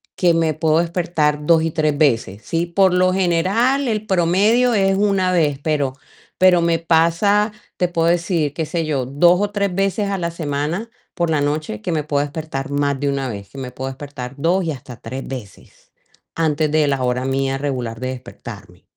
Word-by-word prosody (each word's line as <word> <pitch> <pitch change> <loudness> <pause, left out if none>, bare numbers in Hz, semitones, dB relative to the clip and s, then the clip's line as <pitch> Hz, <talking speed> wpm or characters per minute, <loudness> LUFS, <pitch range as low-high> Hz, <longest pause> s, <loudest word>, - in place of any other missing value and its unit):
que 175 -2 +3
me 165 -1 +1
puedo 160 +1 +2
despertar 165 -4 0
2 165 -1 +4
y 165 - -1
3 155 -3 0
veces, 115 -9 +1
sí, 170 +1 -1
por 185 +1 +3
lo 185 0 +3
general 195 +10 +1
el 215 -1 -1
promedio 205 +7 +3
es 195 -1 +3
una 195 -2 +2
vez, 150 -5 +1
pero, 145 -4 0 0.4
pero 180 -2 +5
me 170 -1 +2
pasa, 170 +6 +2 0.3
te 180 - +2
puedo 165 -1 0
decir, 170 -4 +1
qué 160 - -2
sé 165 +1 -2
yo, 140 -5 -1
2 175 +7 +4
o 205 - +1
3 200 -2 -1
veces 195 +2 0
a 195 - -1
la 170 -1 -1
semana 160 +7 -3 0.3
por 170 -1 0
la 150 -2 +1
noche 145 -7 -2
que 175 - -3
me 155 -2 0
puedo 145 -1 0
despertar 145 -2 -5
más 140 -1 0
de 145 -1 0
una 135 -1 -1
vez, 100 -2 -7
que 135 - -14
me 130 -2 -6
puedo 130 +1 -5
despertar 135 -1 -8
2 175 +5 +1
y 160 - -1
hasta 130 -3 -9
3 130 +3 -7
veces 125 -7 -10 0.4
antes 155 -2 +1
de 155 -1 +3
la 135 -2 0
hora 125 +1 0
mía 135 0 0
regular 125 -5 -3
de 130 0 -3
despertarme. 130 -1 -10
160 Hz, 195 wpm, -20 LUFS, 140-180 Hz, 0.4 s, pero